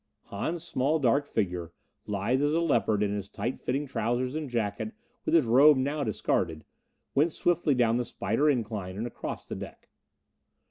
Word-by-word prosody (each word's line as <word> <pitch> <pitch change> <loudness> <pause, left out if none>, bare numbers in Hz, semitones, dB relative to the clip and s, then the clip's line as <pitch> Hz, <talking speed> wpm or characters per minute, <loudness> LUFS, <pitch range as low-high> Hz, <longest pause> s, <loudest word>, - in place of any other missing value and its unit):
Hahn's 160 +12 -2
small 150 -1 +1
dark 140 +1 +2
figure, 90 - -2 0.3
lithe 105 +6 0
as 145 +2 +2
a - - +3
leopard 115 -10 +2
in 100 -1 0
his 100 -1 -4
tight 120 +6 -3
fitting 135 +4 -1
trousers 125 0 -1
and 155 -3 -3
jacket 115 - -2 0.3
with - - +2
his 160 -6 +5
robe 135 +5 +7
now 140 +3 0
discarded, 80 - -1 0.5
went 155 +4 +3
swiftly 170 -5 +2
down 120 -2 +3
the 125 - 0
spider 115 +7 0
incline 105 -8 -2
and 110 - -2
across 120 - -6
the - - -5
deck. - - -9
125 Hz, 170 wpm, -28 LUFS, 105-145 Hz, 0.5 s, robe